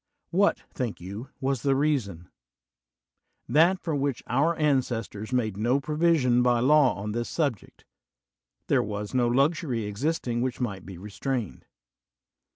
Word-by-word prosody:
What, 200 +4 +2
think 120 -5 -3
you, 100 +8 -8
was 135 -2 -1
the 135 +1 +2
reason? 125 - -1 1.2
That 165 +8 +4
for 165 - -3
which 140 -2 -1
our 145 +7 +1
ancestors 125 -7 -1
made 110 -6 0
no 120 +6 +2
provision 150 -5 +2
by 125 -1 +3
law 135 -2 +4
on 100 +3 -4
this 120 +2 -3
subject: 140 - -3 0.8
there - - +2
was 105 0 -5
no 125 -2 +2
luxury 135 -1 +1
existing 120 +3 -2
which 125 -1 -2
might 100 -8 -4
be 95 -3 -8
restrained. 105 +3 -4
125 Hz, 135 wpm, -27 LUFS, 110-145 Hz, 1.2 s, That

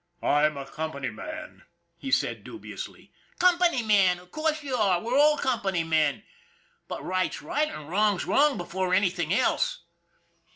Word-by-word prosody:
" - - -40
I'm 150 0 +2
a 140 - -5
company 150 -1 -4
man," 310 0 -8 0.3
he 220 +11 -7
said - - 0
dubiously. - - -9 0.2
"Company 350 -7 +3
man! 195 -4 +4
Of 180 0 -17
course 310 -1 -1
you 270 -3 -2
are. 195 -6 +2
We're 235 +7 -2
all 300 +1 +5
company 200 -11 0
men. 160 +3 +1 0.6
But - - -6
right's 185 0 -1
right 305 +1 0
and 150 - -8
wrong's 205 +2 +1
wrong 290 0 +3
before 185 +1 -1
anything 180 -4 +1
else. - - +1
200 Hz, 155 wpm, -27 LUFS, 175-290 Hz, 0.6 s, all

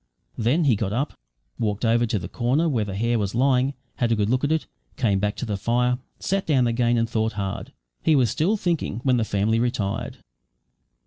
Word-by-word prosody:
Then 125 +10 +2
he 135 -7 +4
got 100 -1 -2
up, 135 +6 -1 0.5
walked 105 +1 -1
over 115 +1 +3
to 110 - 0
the 85 - -5
corner 130 - +1
where 125 -8 +1
the 100 -2 -5
hare 115 +3 +1
was 100 +1 -2
lying, 130 +2 +2 0.2
had 120 -2 +1
a - - +4
good 105 +1 0
look 130 +2 +1
at 145 - +1
it, 160 -1 +1 0.3
came 105 -7 +2
back 105 +1 -1
to - - -4
the 105 -3 -2
fire, 125 +4 +1 0.2
sat 195 0 -1
down 135 -5 +3
again, 120 0 +2
and 115 0 +1
thought 110 -1 -1
hard. 100 -2 -4 0.3
He 160 - +3
was 125 -6 +3
still 195 +8 +1
thinking 170 - -1
when 130 -2 +3
the 115 - +1
family 110 +2 +1
retired. 115 -5 -2
120 Hz, 210 wpm, -24 LUFS, 105-130 Hz, 0.5 s, he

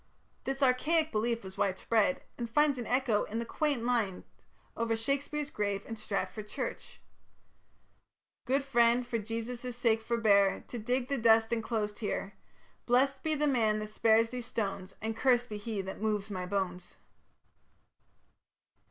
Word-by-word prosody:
This 270 +1 -1
archaic 310 +5 +3
belief 230 +1 0
was 190 0 -10
widespread, 220 +6 +1
and 235 -1 -4
finds 290 +2 +3
an 240 - -4
echo 250 -4 +2
in 220 - -5
the 230 - -2
quaint 285 -1 -1
lines 230 -7 0 0.5
over 230 0 0
Shakespeare's 280 +5 -2
grave 200 -1 -2
in 225 - -5
Stratford 215 0 -3
church: - - -5 1.5
Good 270 +2 +1
friend, 240 -2 +3
for 235 -1 -2
Jesus' 230 +3 -5
sake 225 -2 +2
forbeare 210 -4 +3
To 240 - -5
dig 245 +3 -1
the 275 -1 -1
dust 225 0 +4
enclosed 220 -2 -2
heare; 205 -2 -3 0.5
Blest 265 +2 +3
be 315 -1 0
the 300 0 +1
man 225 -7 +2
that 215 0 -5
spares 225 +1 +4
these 245 -1 -6
stones, 195 -4 -3
And 220 0 -2
curst 245 0 +2
be 210 - -4
he 210 -1 -3
that 190 +1 -7
moves 210 -1 -1
my 185 -2 -3
bones. 180 -2 -3
230 Hz, 150 wpm, -31 LUFS, 210-250 Hz, 1.5 s, dust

